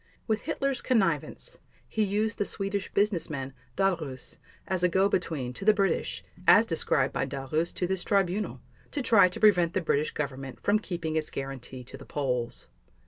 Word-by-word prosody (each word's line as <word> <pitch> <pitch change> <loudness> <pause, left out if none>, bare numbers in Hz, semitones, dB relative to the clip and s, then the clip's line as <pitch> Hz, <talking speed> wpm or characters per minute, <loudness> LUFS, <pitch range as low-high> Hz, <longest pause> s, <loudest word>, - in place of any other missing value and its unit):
With 220 -1 0
Hitler's 275 -2 -1
connivance, 255 - 0 0.3
he 220 - -2
used 210 +1 0
the - - +3
Swedish 195 0 -2
businessman, 160 -10 0 0.2
Dahlerus, 160 -9 -1 0.3
as 185 -2 -1
a 180 - +4
go 190 +3 +3
between 155 -10 -1
to 195 - -7
the 215 +1 +5
British, 195 -4 0 0.2
as - - +8
described - - +1
by - - -1
Dahlerus 145 +5 -2
to 180 - 0
this 190 0 -1
Tribunal, 200 0 0 0.3
to 285 - -3
try 210 -6 +6
to 180 - -7
prevent 180 -6 +5
the - - +3
British 155 -2 +1
Government 135 -2 -5
from 210 +1 +2
keeping 170 -6 -4
its 155 -1 -1
guarantee 135 -1 -6
to 130 +2 -10
the 140 - -12
Poles. 125 -5 -2
180 Hz, 170 wpm, -28 LUFS, 140-205 Hz, 0.3 s, as